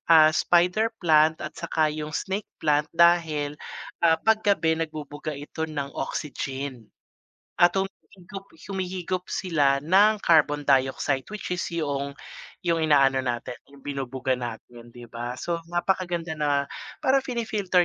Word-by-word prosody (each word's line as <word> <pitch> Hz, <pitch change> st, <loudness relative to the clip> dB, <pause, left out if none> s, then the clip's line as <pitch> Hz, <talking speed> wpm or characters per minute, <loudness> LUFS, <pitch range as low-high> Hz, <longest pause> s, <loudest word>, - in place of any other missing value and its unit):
ah, 155 Hz, -1 st, +7 dB
spider 175 Hz, +7 st, +3 dB, 0.2 s
plant 155 Hz, 0 st, +5 dB
at 150 Hz, -, -5 dB
saka 155 Hz, -2 st, 0 dB
yung 155 Hz, 0 st, -5 dB
snake 195 Hz, +2 st, -3 dB
plant. 150 Hz, 0 st, +1 dB
Dahil, 160 Hz, -4 st, +3 dB, 0.5 s
ah, 165 Hz, -1 st, +5 dB
'pag 220 Hz, +3 st, +2 dB
gabi 200 Hz, -6 st, +2 dB
nagbubuga 150 Hz, -2 st, -5 dB
ito 160 Hz, +2 st, -5 dB
ng 140 Hz, -2 st, -4 dB
oxygen 135 Hz, -5 st, -5 dB, 0.7 s
at 175 Hz, 0 st, +5 dB
humihigop 195 Hz, 0 st, -7 dB, 0.2 s
humihigop 185 Hz, -1 st, -3 dB
sila 145 Hz, -7 st, +2 dB
ng 200 Hz, +7 st, +4 dB
carbon 150 Hz, -3 st, +4 dB
dioxide, 135 Hz, 0 st, +2 dB
which 210 Hz, -, -5 dB
is 175 Hz, -, -3 dB
'yong 140 Hz, -4 st, -2 dB, 0.5 s
'yong 165 Hz, -1 st, +2 dB
inaano 135 Hz, -3 st, +4 dB
natin 120 Hz, 0 st, -3 dB
yung 140 Hz, -1 st, -16 dB
binubuga 135 Hz, -2 st, -2 dB
natin, 120 Hz, 0 st, -8 dB
di 120 Hz, -1 st, -11 dB
ba? 120 Hz, +1 st, -5 dB
So, 170 Hz, -1 st, -2 dB
napakaganda 175 Hz, -2 st, -1 dB
na, 145 Hz, -2 st, +1 dB, 0.4 s
para 270 Hz, +1 st, +3 dB
pini-filter 210 Hz, -7 st, +1 dB
155 Hz, 130 wpm, -25 LUFS, 140-180 Hz, 0.7 s, ah